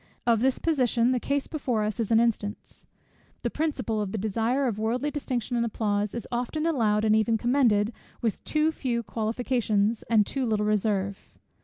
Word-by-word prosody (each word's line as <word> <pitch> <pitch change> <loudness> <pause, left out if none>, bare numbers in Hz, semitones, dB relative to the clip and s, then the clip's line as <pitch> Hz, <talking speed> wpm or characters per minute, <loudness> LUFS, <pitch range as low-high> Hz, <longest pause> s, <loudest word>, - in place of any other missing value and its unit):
Of 230 -2 +4
this 260 +2 +2
position, 250 -6 +2
the 255 - +1
case 280 +2 -1
before 250 -8 -1
us 215 +2 -3
is 225 - -1
an 225 -1 +5
instance. 220 -3 -2 0.6
This - - -1
principle 285 -8 -1
of 200 -2 -3
the 220 - -3
desire 225 +6 0
of 220 -5 -1
worldly 240 +7 0
distinction 255 -5 -3
and 235 - +2
applause, 210 -2 -1
is 235 - -5
often 250 +6 -2
allowed, 220 -9 +2
and 215 0 +4
even 220 +1 +2
commended, 235 -3 +2 0.3
with 225 -3 -2
too 310 +1 +1
few 240 -6 -2
qualifications, 220 0 0
and 220 -3 +4
too 270 +4 -2
little 210 -1 +1
reserve. 200 -2 -1
230 Hz, 175 wpm, -27 LUFS, 215-255 Hz, 0.6 s, an